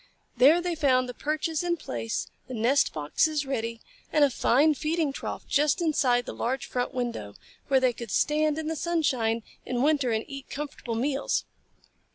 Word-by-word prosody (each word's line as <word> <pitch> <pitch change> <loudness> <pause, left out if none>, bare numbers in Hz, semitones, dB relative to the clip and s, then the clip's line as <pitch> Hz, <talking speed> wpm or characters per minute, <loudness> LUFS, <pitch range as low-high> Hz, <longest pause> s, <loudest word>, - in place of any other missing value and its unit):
There 285 +8 +6
they 355 0 -1
found 260 -5 +2
the 250 - -6
perches 310 +3 -1
in 345 -1 0
place, 115 - -3 0.2
the 255 - -6
nest 245 +6 +3
boxes 290 - 0
ready, 230 -4 -3 0.3
and 300 - +4
a 280 - +4
fine 290 +6 +3
feeding 310 0 -1
trough - - -5
just 295 0 +2
inside 265 -7 +2
the - - -6
large 260 +2 -2
front 245 -1 -2
window, 235 - -4 0.3
where 270 -1 +4
they 255 -1 +2
could 235 -1 -8
stand 305 +5 +2
in 315 - -3
the 320 +1 -2
sunshine 265 -9 0 0.2
in 245 0 -1
winter 285 -4 +2
and 220 0 -1
eat 275 -1 -8
comfortable 275 -5 -5
meals. 270 +4 0
275 Hz, 175 wpm, -27 LUFS, 245-305 Hz, 0.3 s, There